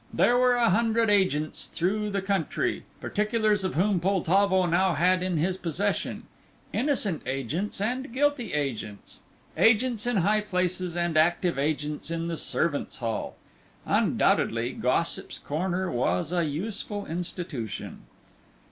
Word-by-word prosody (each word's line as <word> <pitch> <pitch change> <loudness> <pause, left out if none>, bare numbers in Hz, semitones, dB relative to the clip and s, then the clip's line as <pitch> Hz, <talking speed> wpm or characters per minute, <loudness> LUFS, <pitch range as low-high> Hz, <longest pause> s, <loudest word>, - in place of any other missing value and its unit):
There 245 - +3
were 250 0 +4
a 235 -2 +3
hundred 225 +1 +2
agents 185 -7 +1
through 210 +5 -1
the 200 -1 -2
country, 195 -5 -1
particulars 210 -1 0
of 185 - -2
whom 190 +3 +2
Poltavo 190 +1 +2
now 175 +1 +2
had 185 +2 +3
in 180 -2 -1
his 180 +4 0
possession. 190 +4 -2 0.5
Innocent 245 - 0
agents, 135 - -2
and 250 +5 -2
guilty 275 -3 0
agents; 120 -8 -4 0.4
agents 225 0 +3
in 245 -3 +1
high 205 +4 +3
places 180 -3 -2
and 170 -2 0
active 170 0 +2
agents 150 +1 -2
in 165 0 -2
the 165 - -3
servants' 155 -2 -1
hall. 115 -3 -3 0.5
Undoubtedly 120 +3 +2
Gossip's 130 +8 -1
Corner 180 +4 -2
was 120 - 0
a 175 -2 +1
useful 205 +6 -3
institution. 165 - -5
185 Hz, 130 wpm, -27 LUFS, 160-210 Hz, 0.5 s, were